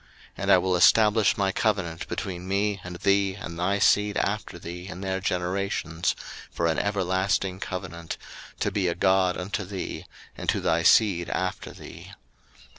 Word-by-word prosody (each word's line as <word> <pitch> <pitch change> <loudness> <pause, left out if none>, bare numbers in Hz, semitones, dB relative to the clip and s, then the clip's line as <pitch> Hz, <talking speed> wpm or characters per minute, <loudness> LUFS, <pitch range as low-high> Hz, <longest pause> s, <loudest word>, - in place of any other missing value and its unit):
01:017:007 - - -28 0.3
And - - +1
I - - +8
will 95 -1 +1
establish 105 +3 +5
my 95 -2 +1
covenant 95 -6 -1
between 90 -1 -5
me 100 0 0
and 90 0 -7
thee 100 +1 +2
and 85 -4 -7
thy 100 +3 +1
seed 105 0 +3
after 105 -3 -2
thee 85 +2 -8
in 95 -1 -8
their 95 -1 -2
generations 90 -2 -1 0.3
for 85 - -2
an 80 -1 +1
everlasting 95 -1 0
covenant, 85 -4 -5 0.4
to - - +1
be 95 -3 0
a 85 - 0
God 95 0 +2
unto 100 +3 -3
thee, 95 0 -6 0.3
and - - -4
to - - +2
thy - - +1
seed 95 -6 +4
after 95 0 -2
thee. - - -11
95 Hz, 165 wpm, -26 LUFS, 90-100 Hz, 0.4 s, I